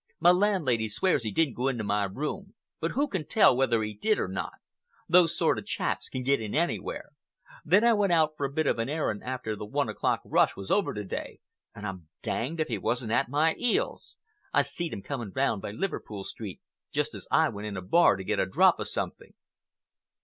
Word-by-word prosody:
My 175 - +7
landlady 180 - +2
swears 185 - +1
he 110 - -2
didn't 140 +5 +1
go 125 +2 -1
into 120 -5 -1
my 105 0 +1
room, 150 - -5 0.2
but 165 - -2
who 285 +3 +1
can 190 - -3
tell 155 - +5
whether 120 -4 +2
he 105 0 -4
did 210 - +1
or - - -1
not? 95 +1 -4 0.5
Those 175 -2 +5
sort - - +2
of - - -11
chaps - - -2
can 130 - -4
get 140 -1 +2
in 105 -2 -4
anywhere. 175 - -2 0.5
Then 210 - +4
I 235 0 +6
went 205 -3 +2
out 160 -2 +4
for 145 - -5
a - - -11
bit 155 +2 0
of 120 - +1
an 115 +3 -1
airing 145 -9 -1
after 125 -4 -4
the 105 - -7
one 105 - -1
o'clock - - 0
rush - - +3
was 100 - -6
over 205 - +2
to 105 - -3
day, 95 - -6 0.4
and 105 - -7
I'm 95 -5 -6 0.2
danged 155 +8 -2
if 155 - +1
he 110 -5 -2
wasn't 120 +2 -1
at 120 - +2
my 155 +4 +3
'eels. 245 -2 -1 0.3
I - - +4
seed 170 -2 -4
him 100 - -6
coming 120 -8 -5
round 130 -6 +1
by - - -5
Liverpool 105 - -4
Street 100 -2 -7 0.3
just - - 0
as - - -8
I - - +4
went 105 +1 -6
in 100 -2 -5
a - - -4
bar 170 - +5
to 95 - -6
get - - -1
a - - +1
drop 95 - +4
of - - -3
something." - - -5
130 Hz, 220 wpm, -28 LUFS, 105-170 Hz, 0.5 s, My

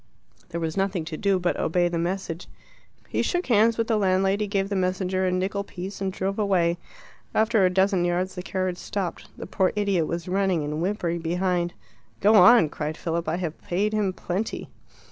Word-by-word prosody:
There 170 - -4
was 160 -1 -2
nothing 195 -4 -1
to 160 -1 -5
do 195 +3 +1
but 180 -1 0
to - - -4
obey 175 +2 +2
the 170 -1 -2
message. 175 0 -3 0.6
He - - 0
shook 355 0 0
hands 225 -1 +4
with 230 - +1
the 225 -1 +1
landlady, 195 +1 +2
gave 195 -1 -1
the 200 - -1
messenger 185 0 0
a - - +1
nickel 190 +2 -1
piece, 190 +1 -7
and 190 -1 -1
drove 195 +2 -3
away. 175 -4 +2 0.6
After 220 -1 +3
a 185 - +5
dozen 190 0 +2
yards 175 +2 0
the 180 - -5
carriage 185 -1 -2
stopped. 190 -4 -4
The - - -6
poor 190 -2 +1
idiot 200 -6 +1
was 170 0 -4
running 190 -3 +1
and 150 +2 -3
whimpering 175 -2 -1
behind. 175 +1 0 0.5
"Go 210 +2 +4
on," 225 -4 +7
cried 155 +1 -4
Philip. 165 -1 -2
"I 165 - 0
have 170 -3 -4
paid 205 +5 -1
him 210 -3 +1
plenty." 185 +3 -4
185 Hz, 195 wpm, -25 LUFS, 175-200 Hz, 0.6 s, on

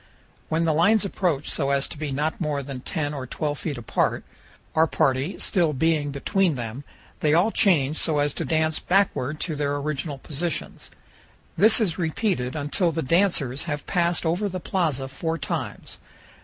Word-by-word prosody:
When 165 +1 +1
the 160 - +2
lines 205 +7 +4
approach 175 -7 -1
so 140 -3 0
as 140 0 +1
to - - -7
be 150 -1 -4
not 150 +5 -1
more 150 -3 -1
than 135 -1 -6
10 145 +3 -3
or 135 -3 -5
12 150 +3 -3
feet 150 -5 -3
apart, 120 - 0 0.5
our 160 +1 +4
party 135 +5 +1
still 170 -5 +1
being 150 +1 +1
between 170 +4 +1
them, 120 +2 -5 0.4
they 150 0 +3
all 185 +7 +4
change 155 -9 +3
so 155 -2 0
as 145 -1 +1
to - - -3
dance 160 +1 +1
backward 155 -6 +1
to 160 - -2
their 145 -1 -1
original 145 0 -2
positions. 155 +4 -4 0.7
This 220 +3 +5
is 185 -7 0
repeated 160 - -1
until 155 +4 0
the 160 +1 -2
dancers 145 -4 +1
have 145 -3 -3
passed 175 -1 +1
over 180 +6 0
the 185 0 -4
plaza 155 -8 -1
four 160 +5 -3
times. 150 - -5
155 Hz, 170 wpm, -25 LUFS, 140-170 Hz, 0.7 s, This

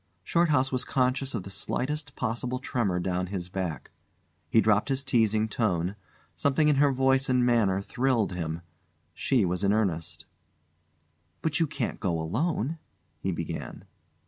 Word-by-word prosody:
Shorthouse 145 - +2
was 130 -1 0
conscious 130 0 0
of 100 - -3
the 95 - -9
slightest 145 +7 -3
possible 125 +1 -2
tremor 115 -8 -1
down 90 0 -1
his 90 -2 -4
back. 90 -6 -4 0.6
He 115 - +5
dropped 110 +2 +3
his 135 0 0
teasing 110 -5 +2
tone. 100 -4 0 0.4
Something 140 - +2
in 145 - +3
her 145 0 +5
voice 135 0 +2
and 125 -1 +3
manner 105 -6 +2
thrilled 125 -4 +1
him. 85 -2 -3 0.5
She 125 -7 +2
was 90 +2 -1
in 100 - +3
earnest. 95 -7 -1 1.2
"But 155 -2 +1
you 165 - +3
can't 140 -4 -3
go 85 -5 0
alone 150 - -1 0.2
" 80 -1 -43
he 95 - -1
began. 85 - -5
115 Hz, 150 wpm, -28 LUFS, 95-135 Hz, 1.2 s, He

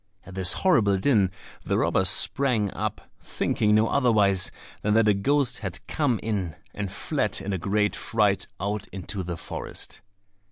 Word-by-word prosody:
At 100 - -11
this 95 -1 +4
horrible 105 - +3
din, 100 -3 +3 0.3
the - - 0
robbers 95 -1 +3
sprang 115 -2 +1
up, - - -3 0.2
thinking 105 0 0
no 110 +1 +4
otherwise 105 -9 +2 0.3
than 105 0 +1
that 110 -1 +4
a 105 - +5
ghost 130 +5 +1
had 95 -4 -5
come 140 -8 0
in, 100 -7 -2 0.2
and 100 -2 -4
fled 100 - -1
in 100 - -4
a 95 - -2
great 105 +3 0
fright 105 -3 +1
out 100 +1 -3
into 95 +1 -6
the 85 -2 -5
forest. - - -5
105 Hz, 160 wpm, -25 LUFS, 95-115 Hz, 0.3 s, a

